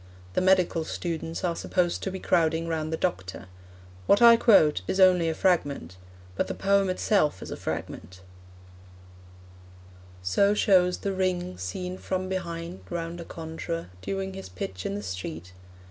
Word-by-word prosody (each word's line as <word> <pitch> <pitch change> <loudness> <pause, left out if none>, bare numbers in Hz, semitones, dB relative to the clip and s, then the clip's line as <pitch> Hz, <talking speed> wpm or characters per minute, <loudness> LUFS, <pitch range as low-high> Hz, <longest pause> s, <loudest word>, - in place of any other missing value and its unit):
The - - +1
medical 185 -3 +3
students 165 0 -4
are 175 -2 0
supposed 175 0 0
to - - -2
be 190 - -5
crowding 165 -1 +1
round 160 -1 -2
the 160 - -1
doctor. 95 - -3 0.6
What 200 - +5
I 235 -1 +9
quote 160 - +5
is 190 - -1
only 180 -3 +5
a 160 - -2
fragment, 145 - 0 0.4
but - - 0
the - - -4
poem 195 0 +2
itself 185 - +1
is - - -8
a - - -3
fragment: 95 0 -6 2.0
So 200 - +3
shows 180 -3 +4
the 200 - -3
ring 185 - -1
Seen, 180 - -5
from 185 0 -3
behind, 170 -1 -4
round 170 0 -4
a - - -8
conjuror 165 - -6
Doing 195 - -3
his 190 - -8
pitch 90 0 -5
in 100 - -3
the 105 - -5
street. 90 -2 -6
170 Hz, 155 wpm, -27 LUFS, 150-185 Hz, 2.0 s, I